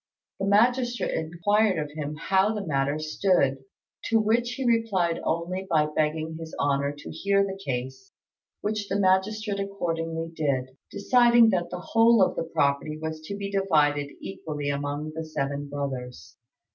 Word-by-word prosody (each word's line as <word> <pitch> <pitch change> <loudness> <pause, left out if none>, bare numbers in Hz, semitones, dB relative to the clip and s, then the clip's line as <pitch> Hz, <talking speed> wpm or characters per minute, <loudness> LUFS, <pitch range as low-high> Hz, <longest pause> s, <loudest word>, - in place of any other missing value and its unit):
The 195 - -1
magistrate 240 +4 +2
inquired 185 +5 +1
of 150 -1 -3
him 150 0 -5
how 190 +6 +1
the 205 -2 -4
matter 140 -1 0
stood; 155 -3 +1 0.5
to 225 - +3
which 230 +3 +1
he 265 +1 -4
replied 210 -8 +1
only 180 +3 -2
by 155 -2 +2
begging 155 +1 -1
His 160 -1 -8
Honour 140 0 0
to 145 - -9
hear 200 0 +2
the 195 0 -4
case; 130 0 -5 0.5
which 210 -1 -2
the 195 +2 0
magistrate 200 +2 +1
accordingly 165 -4 -3
did, 130 -4 -1
deciding 235 +1 +5
that 175 -2 -1
the 180 - -6
whole 230 -2 +6
of - - +1
the - - -2
property 140 +2 0
was 160 0 -5
to 200 - -4
be 200 -1 -5
divided 150 -7 +2
equally 150 -6 -4
among 145 +2 -3
the 160 +1 -4
seven 145 -2 -3
brothers. 135 -3 -5
165 Hz, 155 wpm, -26 LUFS, 145-200 Hz, 0.5 s, whole